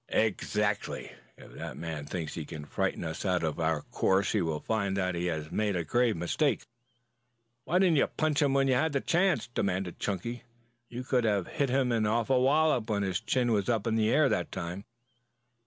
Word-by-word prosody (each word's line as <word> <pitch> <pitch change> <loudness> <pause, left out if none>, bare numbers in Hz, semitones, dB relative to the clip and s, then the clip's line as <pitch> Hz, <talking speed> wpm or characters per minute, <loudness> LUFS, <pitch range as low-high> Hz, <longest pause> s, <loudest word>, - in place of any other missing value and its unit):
"Exactly! 105 -1 -1 0.3
If - - -14
that - - -7
man 80 -2 -5
thinks 80 -5 -4
he 80 - -4
can 75 0 -8
frighten - - -2
us 80 0 -4
out 90 -3 +1
of 80 -2 -2
our 80 -2 0
course 95 +1 +1
he 105 - +1
will 80 -3 -1
find 100 -2 -1
that 90 -1 0
he 85 +1 -2
has 80 -2 -3
made 105 -2 0
a 85 - 0
grave 115 +6 +1
mistake." 135 - 0 1.0
"Why 175 - +1
didn't 180 -4 +4
you - - +4
punch 155 -1 0
him 140 -2 +3
when 135 0 +3
you 130 - +3
had 155 +4 +1
the 140 - +2
chance?" 180 +1 +2
demanded 95 -6 -2
Chunky. 115 +5 -3 0.5
"You 120 +1 -5
could 125 -1 +1
have 100 -5 +1
hit 140 -4 -1
him 130 -1 +2
an 110 -2 +1
awful 120 +4 +2
wallop 135 -4 +3
when 100 -2 +1
his 95 -2 -1
chin 125 -2 +1
was 105 0 +1
in 115 -1 +1
the 110 -1 +2
air - - +4
that - - -1
time." 90 +4 -5
105 Hz, 200 wpm, -29 LUFS, 90-125 Hz, 1.0 s, didn't